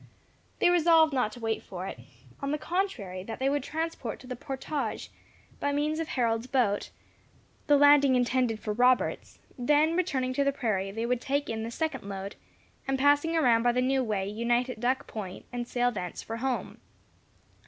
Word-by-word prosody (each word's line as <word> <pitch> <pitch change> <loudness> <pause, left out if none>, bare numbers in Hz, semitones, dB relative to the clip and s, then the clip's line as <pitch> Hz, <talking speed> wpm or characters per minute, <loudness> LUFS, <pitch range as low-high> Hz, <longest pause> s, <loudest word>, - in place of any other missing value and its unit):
They 350 - +4
resolved 325 -3 +5
not 250 -5 +1
to 245 - -10
wait 225 -1 -1
for 185 0 -7
it; 190 - -6 0.4
on 275 - -2
the 300 - 0
contrary, 290 - -2
that 225 - -6
they 270 +1 +1
would 290 0 0
transport 310 -5 -4
to - - -13
the 250 0 -5
portage, 270 -1 -4 0.5
by 285 - 0
means 300 +2 0
of 325 - -2
Harold's 230 -3 0
boat, 240 -6 +1 0.8
the 290 -1 +6
lading 285 -2 +6
intended 245 -2 +1
for 210 - -3
Robert's; 250 +3 +2 0.2
then 300 +6 +3
returning 275 -8 0
to 280 - +1
the 280 - +2
prairie, 215 -8 -1
they 225 +4 -3
would 245 0 0
take 285 +2 -1
in 220 0 -3
the 225 - -4
second 300 +1 -3
load, 195 0 -6 0.5
and 270 0 +1
passing 290 +4 +3
around 240 -7 +4
by 240 0 +3
the 250 - +1
new 260 +1 +2
way, 205 -4 -1
unite 240 +4 0
at 225 - -9
Duck 250 +3 0
Point, 195 -4 -7
and 240 -1 -3
sail 245 0 +1
thence 180 -6 -5
for 225 - -5
home. 255 +1 -3
255 Hz, 185 wpm, -28 LUFS, 225-285 Hz, 0.8 s, the